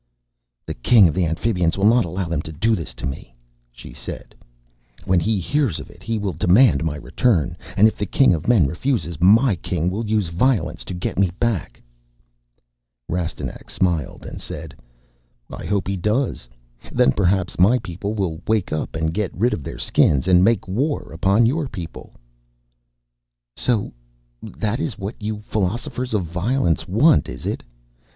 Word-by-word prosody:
"The - - -4
King 100 - +5
of 80 - -1
the 85 +1 +1
Amphibians 85 0 0
will 100 - +1
not 115 +2 +5
allow 90 +2 -3
them 80 -3 -1
to 80 - -9
do 110 +9 +1
this 75 -9 -6
to - - -6
me," 65 -2 -6 0.4
she - - -12
said. - - -7 0.7
"When 95 -1 +3
he 105 +4 0
hears 125 - 0
of - - -10
it - - -18
he 115 -1 -2
will 100 -3 -2
demand 90 - +4
my 80 -2 -1
return. 85 - 0 0.2
And 105 +3 +7
if 110 - -2
the 105 - -1
King 135 0 +4
of 80 - -3
Men 115 -10 +5
refuses, 85 - -2
my 110 +5 +5
King 90 +1 -2
will 105 +5 -3
use 105 -5 0
violence 115 +8 0
to 90 - -6
get 90 0 -3
me 100 -2 +3
back." 115 -8 -1 1.3
Rastignac 85 -1 -4
smiled 85 -7 -1
and - - -8
said, 75 -1 -7 0.8
"I - - -7
hope 100 -1 -1
he 100 0 -1
does. 105 - -1 0.4
Then 65 - +4
perhaps 95 0 0
my 105 +8 +5
people 100 0 -5
will 90 -5 -2
wake 110 -7 0
up 75 - -3
and 80 0 -1
get 105 0 -1
rid 120 +6 +2
of - - -3
their - - -7
Skins 70 +4 +2
and 90 -1 +5
make 115 +1 +2
war 135 +11 -2
upon 95 +8 +3
your 145 +5 0
people." 90 -9 -9 1.4
"So 115 -5 0 0.5
that 105 - -3
is 150 -8 -3
what 100 +3 -6
you 105 0 -4
Philosophers 120 +5 -2
of 100 - +1
Violence 90 +2 0
want, 125 - +4
is 60 0 -8
it? - - -2
95 Hz, 170 wpm, -21 LUFS, 85-115 Hz, 1.4 s, And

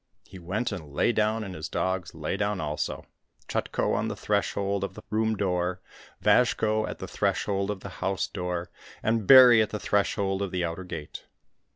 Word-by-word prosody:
He 95 - -12
went 100 +8 -2
and 80 -7 -7
lay - - +3
down, 110 0 +1
and 95 -3 -6
his 80 -1 -6
dogs 95 -4 -2
lay 80 +3 -3
down 105 -1 -1
also, 75 -1 -3 0.4
Chutko - - -1
on - - 0
the - - -3
threshold 100 0 -1
of 100 - -4
the - - -10
room 110 0 +1
door, 90 -2 -1 0.4
Vazhko 110 0 +3
at - - -6
the - - -7
threshold 100 -1 -1
of 100 -2 -3
the - - -7
house 95 -1 0
door, 90 -2 -4 0.3
and 110 -2 0
Bary 125 -3 +9
at 110 - 0
the 105 - -4
threshold 100 -1 0
of 100 - -1
the 90 -1 -1
outer 85 +3 -5
gate. 80 -4 -8
95 Hz, 185 wpm, -27 LUFS, 90-105 Hz, 0.4 s, Bary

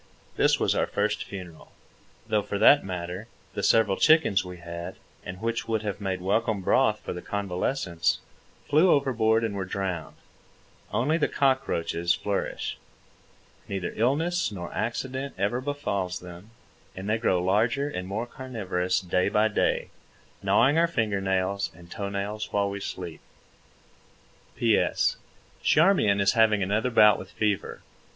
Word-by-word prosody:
This - - +3
was - - +2
our - - +1
first 105 +1 -1
funeral—though 95 +3 -7
for 100 - -4
that 140 +7 +6
matter, 90 +2 -5 0.3
the - - -3
several 110 -4 +3
chickens 155 - +4
we 90 -1 -8
had, 85 +1 -7 0.3
and 90 +1 -7
which 115 +1 -2
would 110 -1 -1
have 105 -1 -4
made 95 -2 -2
welcome 105 +2 0
broth - - +2
for - - -5
the 90 - -6
convalescents, 95 - -1 0.5
flew 155 +6 +4
overboard 115 -6 +3
and 110 -2 -1
were 100 -1 -3
drowned. 95 -3 -4 0.8
Only 155 +7 +1
the - - +2
cockroaches 90 - +1
flourish. 100 0 -3 0.9
Neither 95 -3 -3
illness 160 +9 +1
nor 90 -4 -7
accident 130 +4 -3
ever 105 +6 0
befalls 100 -10 -2
them, 90 +3 -11 0.5
and 95 +1 -6
they 110 +1 +1
grow 95 -6 +2
larger 110 +10 +1
and 90 -10 -5
more 105 +5 -3
carnivorous 100 -9 -2
day 90 0 +1
by 110 +1 +3
day, 105 - 0 0.5
gnawing 145 +4 +4
our 170 - +4
finger 110 -11 -1
nails 95 +1 0
and 85 +1 -16
toe 100 -1 -4
nails 105 +2 -4
while 100 -1 +1
we 100 - -5
sleep. 90 -4 -6 1.3
P.S. 115 -3 +2 0.4
Charmian 155 - +4
is 100 0 +4
having 110 -3 +4
another 105 +6 0
bout 105 -3 +6
with 95 - -9
fever. 105 -1 -2
100 Hz, 145 wpm, -26 LUFS, 95-115 Hz, 1.3 s, that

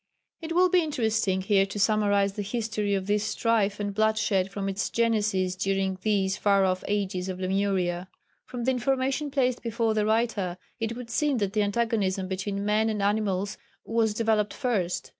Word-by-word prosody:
It 325 0 -4
will 365 +1 +5
be 365 0 +3
interesting 220 - 0
here 195 0 +3
to 200 +1 -6
summarise 205 -1 +2
the 205 - -4
history 210 -1 -1
of 190 -1 -2
this 205 +1 +1
strife 215 -2 0
and 205 -1 -2
bloodshed 215 -3 +1
from 195 0 -4
its 195 0 -2
genesis 210 -5 +1
during 190 0 -1
these 195 -2 +1
far 200 -1 +3
off 185 0 0
ages 190 -2 -1
on 185 - -4
Lemuria. 185 -2 -1 0.4
From 245 -1 -5
the 260 - +2
information 265 +3 0
placed 255 -3 0
before 230 -1 0
the 215 -1 +1
writer 220 -5 0 0.2
it 225 0 -2
would 240 -2 -8
seem 290 +1 +1
that 200 -3 -1
the 215 - +2
antagonism 205 -3 0
between 195 +2 -3
men 215 +1 +2
and 210 -2 -2
animals 200 -1 0 0.3
was 225 -2 +1
developed 215 -2 +1
first. 205 -9 -1
210 Hz, 175 wpm, -27 LUFS, 195-230 Hz, 0.4 s, will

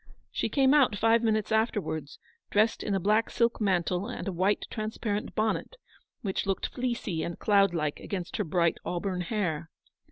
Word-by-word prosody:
She - - -1
came 270 -1 +4
out 270 -8 +5
five 225 +2 +3
minutes 215 -2 +1
after 220 0 +2
wards, 155 -6 -5 0.3
dressed 215 +2 +2
in 200 - -1
a - - +1
black 215 +4 +2
silk 235 -1 +1
mantle 185 -1 +1
and 245 - -5
a - - 0
white 190 +4 +1
transparent 215 -1 -3
bonnet, 220 - -1 0.5
which 195 -1 -2
looked 195 - -1
fleecy 235 -9 -2
and 170 - -4
cloud 195 -3 +3
like 150 -3 -1
against 185 -3 -4
her 210 - +1
bright 170 -1 +1
auburn 180 +1 -2
hair. 170 -5 -2
205 Hz, 170 wpm, -29 LUFS, 180-220 Hz, 0.5 s, out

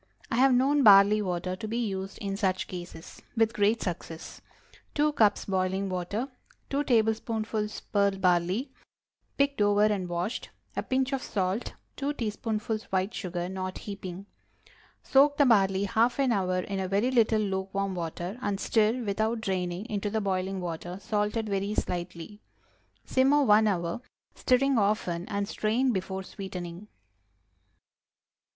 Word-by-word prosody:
I 230 - +1
have 265 +1 +5
known 280 +3 +3
barley 205 -1 +7
water 180 -1 -2
to 220 +3 -6
be 225 +2 -2
used, 195 -4 -3
in 195 -1 -3
such 190 -2 0
cases, 175 -2 -9 0.2
with 225 0 +3
great 215 +2 +2
success. 165 -2 -6 0.5
2 300 +1 +3
cups 215 -6 +3
boiling 190 0 -1
water. 185 +7 -2 0.4
2 285 +1 0
tablespoonfuls 220 -2 0
pearl 200 -1 +1
barley—picked 205 +8 -1
over 205 0 +4
and 200 -4 0
washed. 175 +7 -3 0.3
A - - 0
pinch 265 +1 0
of 270 - -1
salt. 190 +3 -2 0.2
2 285 +1 -1
teaspoonfuls 215 -2 -3
white 190 +2 -1
sugar—not 185 0 -4
heaping. 195 -2 -7 0.8
Soak 285 +2 +4
the 285 - +5
barley 195 -5 +4
half 225 +5 +2
an 270 -3 +2
hour 185 -4 +1
in 195 +1 -4
a 190 - -1
very 205 +7 +1
little 225 -3 +3
lukewarm 195 0 -2
water, 175 +4 -5
and 200 -4 -1
stir, 225 +3 +2
without 220 +2 0
draining, 185 -2 -2
into 210 -3 -2
the 220 +1 0
boiling 190 -1 -1
water, 175 0 -5
salted 210 +2 -1
very 200 +1 -1
slightly. 175 +3 -4 0.6
Simmer 275 +3 +3
one 215 -3 +5
hour, 175 +1 -1 0.3
stirring 260 0 +2
often, 200 -4 0
and 200 -1 -1
strain 230 +5 +1
before 190 -2 -3
sweetening. 185 -1 -7
205 Hz, 140 wpm, -28 LUFS, 185-225 Hz, 0.8 s, barley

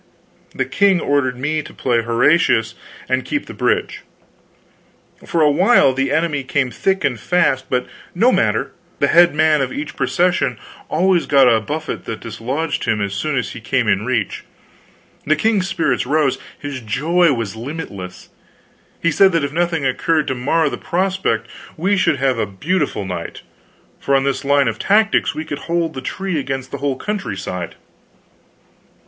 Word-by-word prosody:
The - - 0
king 200 -3 +3
ordered 140 -5 0
me 150 +4 -1
to - - -13
play 120 -3 +1
Horatius 115 -1 +2 0.3
and 130 0 0
keep 290 - -3
the - - -9
bridge. - - -1 1.3
For 165 - 0
a 150 - +5
while 185 - +4
the 135 +1 -1
enemy 150 -2 0
came 130 -1 0
thick 190 +10 0
and 125 -4 0
fast; 130 -4 +1
but 125 0 0 0.3
no - - +4
matter, - - +1 0.3
the - - +1
head 175 -2 +5
man 155 -1 +3
of 130 -1 -1
each 145 +2 -5
procession 175 -9 +1 0.3
always 180 +2 +2
got 135 -2 +5
a 115 -2 +4
buffet 155 +8 -5
that 110 - -5
dislodged 125 +8 -3
him 110 - 0
as 100 -1 -2
soon 140 +8 -2
as 125 - -2
he 120 - -9
came 120 +1 0
in 105 -1 +2
reach. 115 -4 -2 0.8
The 155 - +4
king's 200 +2 +1
spirits 150 -11 0
rose, 150 -1 +1 0.2
his 140 -3 -6
joy 155 +9 +2
was 115 -4 -4
limitless. 110 - -7 0.7
He 170 - +3
said 190 +5 +5
that 165 -3 +1
if 140 0 -3
nothing 170 -3 0
occurred 155 +4 +1
to - - 0
mar 145 +6 +1
the - - -4
prospect 175 -9 -1 0.3
we 190 +6 +1
should 185 -6 +2
have 130 -3 0
a 105 - 0
beautiful 145 - -2
night, 90 -3 -6 0.6
for 140 - +1
on 135 - +3
this 140 +1 -1
line 140 -1 +3
of 115 - -2
tactics 215 +1 +2
we 155 - -4
could 145 -2 -5
hold 170 -1 0
the 130 - -6
tree 185 +4 -3
against 135 -1 -4
the 140 - -5
whole 140 -1 -1
country 195 - -4
side. 90 -3 -5
140 Hz, 170 wpm, -19 LUFS, 125-165 Hz, 1.3 s, a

